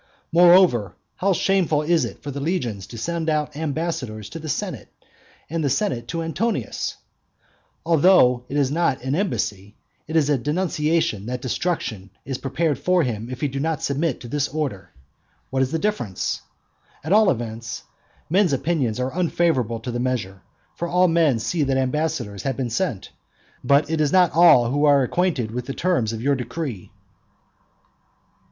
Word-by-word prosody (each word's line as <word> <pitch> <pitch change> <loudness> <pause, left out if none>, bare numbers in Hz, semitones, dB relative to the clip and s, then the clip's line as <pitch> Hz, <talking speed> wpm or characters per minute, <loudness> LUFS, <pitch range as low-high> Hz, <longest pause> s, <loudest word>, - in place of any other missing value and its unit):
Moreover, 170 - +5 0.2
how 195 +2 +1
shameful 175 -5 +1
it 160 - -2
is 170 - +2
for 145 - -5
the 140 - -5
legions 140 - -2
to 115 - -9
send 165 +6 -2
out 150 -1 -1
ambassadors 145 -9 -3
to 165 - -7
the 155 0 -7
senate, - - -3 0.6
and 165 +1 -2
the 140 - +1
senate 135 - -1
to 165 -1 -3
Antonius! 165 +9 -2 0.9
Although 160 -7 +5
that 140 - -3
is 140 -2 +2
not 145 -5 0
an 130 +1 -1
embassy; 105 - -2 0.3
it 160 - -5
is 155 -3 +4
a 145 -3 +2
denunciation 150 - 0
that 125 +1 -3
destruction 120 - -3 0.2
is 130 -1 -4
prepared 145 +2 -1
for 180 -1 +2
him 115 -3 -3
if 130 0 -7
he 145 - +1
do 135 0 -4
not 160 +1 -1
submit 140 0 -1
to 120 - -8
this 145 +3 -1
order. 140 -10 -4 0.6
What 135 0 +1
is 130 - +1
the 165 - 0
difference? 160 - -2 0.6
At 155 +6 0
all 215 -1 +6
events, 115 -2 -4 0.4
men's 180 0 +3
opinions 135 -6 0
are 130 +3 -2
unfavourable 165 -10 +1
to 125 - -4
the 120 - -3
measure; 115 -7 -2 0.3
for 170 - -4
all 180 +1 +3
men 165 -7 +3
see 160 +8 -2
that 135 -2 +1
ambassadors 130 -6 -1
have 135 -3 -2
been 125 -3 -2
sent, 120 - -2 0.5
but 140 +3 +3
it 160 0 -1
is 150 -2 +2
not 180 -2 +5
all 155 -8 +6
who 145 +2 +1
are 140 -2 +5
acquainted 135 -6 0
with 125 +1 -5
the 135 - -4
terms 170 -12 +1
of 115 0 -5
your 140 +1 +3
decree. 130 - -4
145 Hz, 170 wpm, -23 LUFS, 125-165 Hz, 0.9 s, all